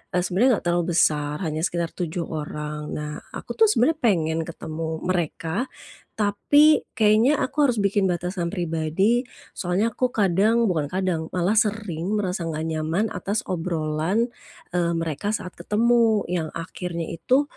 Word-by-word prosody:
eee, 180 Hz, -, +3 dB
sebenarnya 235 Hz, +8 st, +3 dB
nggak -, -, -22 dB
terlalu 175 Hz, 0 st, +1 dB
besar 150 Hz, -2 st, +2 dB
hanya 155 Hz, -1 st, -2 dB
sekitar 170 Hz, -2 st, -2 dB
7 175 Hz, -1 st, -3 dB
orang. 150 Hz, -1 st, -5 dB
Nah, 150 Hz, 0 st, -4 dB, 0.2 s
aku -, -, -6 dB
tuh 445 Hz, -, +7 dB
sebenarnya 315 Hz, -, +2 dB
pengen 165 Hz, -8 st, +2 dB
ketemu 160 Hz, -1 st, -5 dB
mereka, 175 Hz, -, -1 dB, 0.5 s
tapi 285 Hz, +9 st, +4 dB
kayaknya, 220 Hz, +6 st, +4 dB
aku 290 Hz, +2 st, +2 dB
harus 245 Hz, -, +1 dB
bikin 200 Hz, 0 st, +2 dB
batasan 175 Hz, 0 st, -2 dB
pribadi. 175 Hz, +6 st, +1 dB, 0.3 s
Soalnya 190 Hz, +6 st, 0 dB
aku 250 Hz, +2 st, 0 dB
kadang 210 Hz, +4 st, +3 dB
bukan 155 Hz, -5 st, 0 dB
kadang, 185 Hz, -4 st, -1 dB
malah 180 Hz, +4 st, +2 dB
sering 210 Hz, -4 st, -1 dB
merasa 185 Hz, -3 st, -2 dB
nggak 155 Hz, -1 st, -3 dB
nyaman 160 Hz, +5 st, 0 dB
atas 210 Hz, +5 st, -2 dB
obrolan, 165 Hz, +5 st, -1 dB, 0.5 s
eee, 170 Hz, -1 st, +1 dB
mereka 165 Hz, +5 st, -2 dB
saat 185 Hz, -4 st, -6 dB
ketemu 225 Hz, -1 st, +3 dB
yang 170 Hz, -3 st, -1 dB
akhirnya 170 Hz, 0 st, -4 dB
itu 255 Hz, -, +2 dB
180 Hz, 145 wpm, -24 LUFS, 160-215 Hz, 0.5 s, tuh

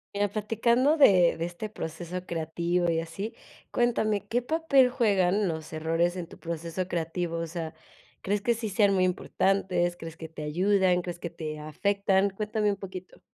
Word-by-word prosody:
Mira 205 Hz, 0 st, +1 dB
platicando 235 Hz, +7 st, +2 dB
de 185 Hz, -, +6 dB
de 165 Hz, -, -2 dB
este 175 Hz, +5 st, -4 dB
proceso 175 Hz, -1 st, -6 dB
creativo 170 Hz, +1 st, -1 dB
y 165 Hz, -1 st, +1 dB
así, 195 Hz, +7 st, -6 dB, 0.4 s
cuéntame, 215 Hz, -4 st, +1 dB
¿qué 235 Hz, +4 st, 0 dB
papel 280 Hz, -2 st, +3 dB
juegan 205 Hz, -6 st, +2 dB
los 160 Hz, -1 st, -5 dB
errores 165 Hz, +3 st, 0 dB
en 180 Hz, -2 st, -4 dB
tu -, -, -13 dB
proceso 170 Hz, +2 st, -4 dB
creativo? 170 Hz, 0 st, -2 dB
O 165 Hz, -, -2 dB
sea, 165 Hz, -1 st, -5 dB, 0.5 s
¿crees 205 Hz, +2 st, 0 dB
que 235 Hz, +3 st, +2 dB
sí 220 Hz, -1 st, -4 dB
sean 200 Hz, 0 st, +3 dB
muy 185 Hz, -1 st, +3 dB
importantes?, 180 Hz, -1 st, +1 dB
¿crees 165 Hz, -2 st, -8 dB
que 160 Hz, -1 st, -8 dB
te 155 Hz, -1 st, -8 dB
ayudan?, 180 Hz, +3 st, +2 dB
¿crees 175 Hz, -1 st, -6 dB
que 170 Hz, -, -4 dB
te 155 Hz, -2 st, -6 dB
afectan? 195 Hz, +5 st, +1 dB
Cuéntame 210 Hz, +1 st, -1 dB
un 200 Hz, -, -3 dB
poquito. 185 Hz, -2 st, -9 dB
185 Hz, 170 wpm, -28 LUFS, 170-210 Hz, 0.5 s, de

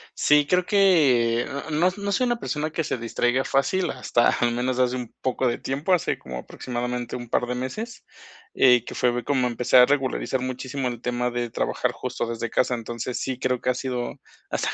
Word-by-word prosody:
Sí, 150 Hz, -1 st, +4 dB
creo 180 Hz, +2 st, +2 dB
que, 140 Hz, -, +4 dB
eh, -, -, -3 dB, 0.3 s
no 170 Hz, +5 st, +3 dB
no 200 Hz, 0 st, -3 dB
soy 250 Hz, +5 st, +2 dB
una 240 Hz, -1 st, 0 dB
persona 155 Hz, 0 st, -3 dB
que 165 Hz, -, -1 dB
se 130 Hz, -, -2 dB
distraiga 120 Hz, +2 st, 0 dB
fácil, 175 Hz, +7 st, +1 dB
hasta 120 Hz, -, +2 dB
al 120 Hz, -1 st, +1 dB
menos 125 Hz, +1 st, -1 dB
hace 125 Hz, 0 st, +2 dB
un 125 Hz, -2 st, -6 dB
poco 130 Hz, 0 st, 0 dB
de 120 Hz, -, 0 dB
tiempo, 145 Hz, +7 st, -1 dB
hace 175 Hz, -, +1 dB
como 65 Hz, -1 st, -7 dB
aproximadamente 125 Hz, -, -4 dB
un 120 Hz, -2 st, -7 dB
par 125 Hz, -, +1 dB
de 125 Hz, 0 st, -3 dB
meses, 215 Hz, -, -5 dB, 0.5 s
eh, 125 Hz, -3 st, +5 dB
que -, -, -7 dB
fue 120 Hz, -1 st, +1 dB
como 130 Hz, -2 st, +1 dB
empecé 125 Hz, +1 st, +2 dB
a 125 Hz, -, +9 dB
regularizar 135 Hz, -2 st, 0 dB
muchísimo 130 Hz, +1 st, -3 dB
el 120 Hz, -1 st, -5 dB
tema 125 Hz, 0 st, -1 dB
de 120 Hz, -1 st, -3 dB
trabajar -, -, -1 dB
justo 125 Hz, -1 st, -4 dB
desde 115 Hz, 0 st, -3 dB
casa. 125 Hz, +1 st, +1 dB
Entonces 120 Hz, +1 st, -5 dB
sí, 130 Hz, -1 st, -3 dB
creo 125 Hz, -1 st, 0 dB
que 125 Hz, -, 0 dB
ha -, -, +3 dB
sido, 125 Hz, -2 st, -3 dB, 0.3 s
hasta -, -, -1 dB
125 Hz, 205 wpm, -24 LUFS, 120-140 Hz, 0.5 s, a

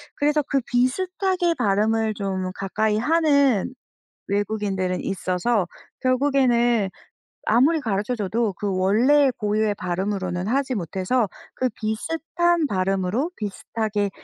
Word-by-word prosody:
그래서 295 Hz, +1 st, +2 dB
그 275 Hz, 0 st, 0 dB
비슷하게 360 Hz, +8 st, +1 dB
발음을 220 Hz, 0 st, +1 dB
좀 190 Hz, -2 st, -3 dB
가까이 210 Hz, +3 st, 0 dB
하는 280 Hz, -, +2 dB, 0.5 s
외국인들은 200 Hz, -3 st, -1 dB
있어서 185 Hz, +2 st, 0 dB, 0.3 s
결국에는 250 Hz, -5 st, +2 dB, 0.6 s
아무리 275 Hz, +9 st, +4 dB
가르쳐줘도 215 Hz, -1 st, -1 dB
그 200 Hz, -1 st, -2 dB
원래의 250 Hz, +10 st, +4 dB
고유의 210 Hz, 0 st, 0 dB
발음으로는 185 Hz, 0 st, -2 dB
하지 265 Hz, +1 st, 0 dB
못해서 190 Hz, +5 st, 0 dB, 0.3 s
그 255 Hz, -, 0 dB
비슷한 325 Hz, +9 st, 0 dB
발음으로 195 Hz, -, 0 dB
비슷하게 210 Hz, 0 st, -2 dB
220 Hz, 280 characters per minute, -23 LUFS, 195-265 Hz, 0.6 s, 아무리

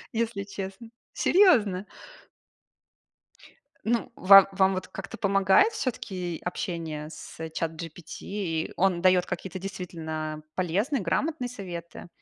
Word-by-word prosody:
если 225 Hz, -3 st, -1 dB
честно. 195 Hz, +2 st, -7 dB, 0.2 s
Серьезно? 215 Hz, -, +4 dB, 2.0 s
Ну, 235 Hz, +1 st, 0 dB
ва 195 Hz, 0 st, +8 dB
вам 190 Hz, 0 st, +3 dB
вот 185 Hz, -, -4 dB
как-то -, -, -8 dB
помогает 195 Hz, -, +4 dB
всё-таки 185 Hz, -, -3 dB
общение 165 Hz, -4 st, -4 dB
с 160 Hz, -, -11 dB
ChatGPT? 160 Hz, +1 st, -5 dB
И 175 Hz, -6 st, -3 dB
он 185 Hz, -2 st, +2 dB
даёт 185 Hz, -1 st, +4 dB
какие-то 190 Hz, 0 st, -5 dB
действительно 160 Hz, -5 st, -5 dB
полезные, 200 Hz, -, 0 dB
грамотные 275 Hz, -, -1 dB
советы? 175 Hz, -8 st, -8 dB
190 Hz, 105 wpm, -27 LUFS, 170-205 Hz, 2.0 s, ва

